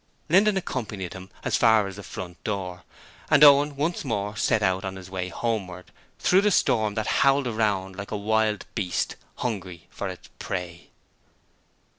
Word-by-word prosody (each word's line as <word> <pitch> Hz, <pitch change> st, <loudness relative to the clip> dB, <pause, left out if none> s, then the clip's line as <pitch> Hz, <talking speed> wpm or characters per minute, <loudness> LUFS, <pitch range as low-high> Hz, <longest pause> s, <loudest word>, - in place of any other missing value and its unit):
Linden 195 Hz, +4 st, +4 dB
accompanied 105 Hz, -, -4 dB
him 95 Hz, 0 st, -10 dB
as -, -, 0 dB
far 110 Hz, -3 st, +5 dB
as 95 Hz, -1 st, -6 dB
the 100 Hz, -, -8 dB
front 90 Hz, -2 st, -8 dB
door, 90 Hz, -4 st, -4 dB, 0.5 s
and 150 Hz, -1 st, +6 dB
Owen 145 Hz, 0 st, +7 dB
once 155 Hz, +5 st, -1 dB
more 105 Hz, -5 st, -2 dB
set 105 Hz, 0 st, +1 dB
out 95 Hz, 0 st, +1 dB
on 95 Hz, -1 st, -4 dB
his 95 Hz, -1 st, -10 dB
way 90 Hz, -1 st, -3 dB
homeward 95 Hz, -2 st, -3 dB, 0.3 s
through 185 Hz, +2 st, +4 dB
the 210 Hz, -, +3 dB
storm 110 Hz, -, +2 dB
that 110 Hz, -1 st, -1 dB, 0.2 s
howled 140 Hz, 0 st, +4 dB
around 105 Hz, -5 st, -1 dB
like 100 Hz, 0 st, -6 dB
a 105 Hz, -, -3 dB
wild 110 Hz, 0 st, 0 dB
beast 90 Hz, -2 st, -1 dB, 0.2 s
hungry 95 Hz, -8 st, -4 dB
for -, -, -4 dB
its -, -, -9 dB
prey. 90 Hz, -2 st, -5 dB
105 Hz, 165 wpm, -25 LUFS, 95-125 Hz, 0.5 s, Owen